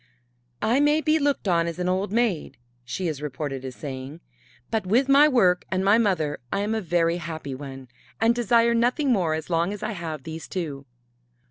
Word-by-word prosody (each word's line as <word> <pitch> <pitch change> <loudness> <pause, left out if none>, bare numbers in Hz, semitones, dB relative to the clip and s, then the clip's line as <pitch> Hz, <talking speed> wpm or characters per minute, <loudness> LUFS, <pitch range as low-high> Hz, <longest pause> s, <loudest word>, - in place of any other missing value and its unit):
"I 235 +5 +3
may 295 +1 +4
be 315 0 +2
looked 285 -7 0
on 170 -2 +2
as 170 - -4
an 180 0 -2
old 185 +2 0
maid," 225 -7 0 0.3
she 150 +10 -3
is 150 -3 -4
reported 140 -2 -4
as 130 -2 -6
saying, 135 +2 -7 0.5
"but 220 -1 0
with 245 +8 +3
my 280 +2 +7
work 185 -11 +3
and 190 0 -1
my 205 +3 +5
mother 170 -9 0
I 200 - 0
am 210 +2 -1
a 220 - -1
very 170 -1 +1
happy 160 -4 -6
one, 135 -1 -8 0.3
and 225 +1 +4
desire 235 0 +3
nothing 250 +4 +2
more 175 -8 +2
as 160 +2 -6
long 170 +3 +1
as 205 - -6
I - - -2
have 165 -7 -5
these 160 +1 -7
two." 145 -7 -5
180 Hz, 200 wpm, -25 LUFS, 155-230 Hz, 0.5 s, my